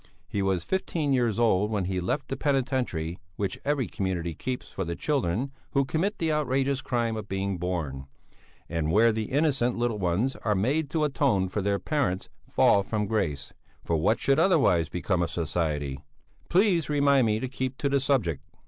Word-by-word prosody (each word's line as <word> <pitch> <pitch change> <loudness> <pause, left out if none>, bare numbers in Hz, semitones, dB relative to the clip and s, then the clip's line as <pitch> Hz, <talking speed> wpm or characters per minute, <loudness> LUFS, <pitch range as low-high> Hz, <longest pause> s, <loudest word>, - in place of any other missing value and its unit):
He 100 - -2
was 95 -3 0
fifteen 165 -6 -1
years 120 -5 +1
old 105 -3 +3
when 105 -4 -1
he 95 0 -1
left 130 +11 -2
the 135 - -1
penitentiary 130 - -1 0.2
which 100 -2 -3
every 145 -3 +1
community 90 -4 -2
keeps 125 +10 -4
for 95 - -3
the 85 -1 -3
children 135 - -1 0.2
who 140 -1 +3
commit 180 +9 -1
the 165 -1 0
outrageous 135 -2 +1
crime 120 -3 -1
of 110 -2 -5
being 95 -1 -2
born, 80 -7 -3 0.6
and 80 -2 -1
where 115 +5 +5
the 110 0 -2
innocent 135 -3 +1
little 120 -3 0
ones 95 +9 0
are 105 -2 0
made 135 +10 +1
to 155 +1 0
atone 100 -10 +1
for 105 - -2
their 100 0 +1
parents' 135 -9 -1 0.2
fall 100 - +4
from 105 +1 -2
grace 75 -10 -2 0.3
for 85 - +1
what 80 +9 +2
should 140 +2 +2
otherwise 135 - +3
become 90 0 -1
of 85 - 0
society? 75 -5 -2 0.5
Please 180 -4 +3
remind 140 -4 +4
me 110 0 +1
to 130 - -3
keep 130 0 -4
to 140 - 0
the 140 0 +2
subject! 115 - +1
110 Hz, 180 wpm, -27 LUFS, 90-140 Hz, 0.6 s, where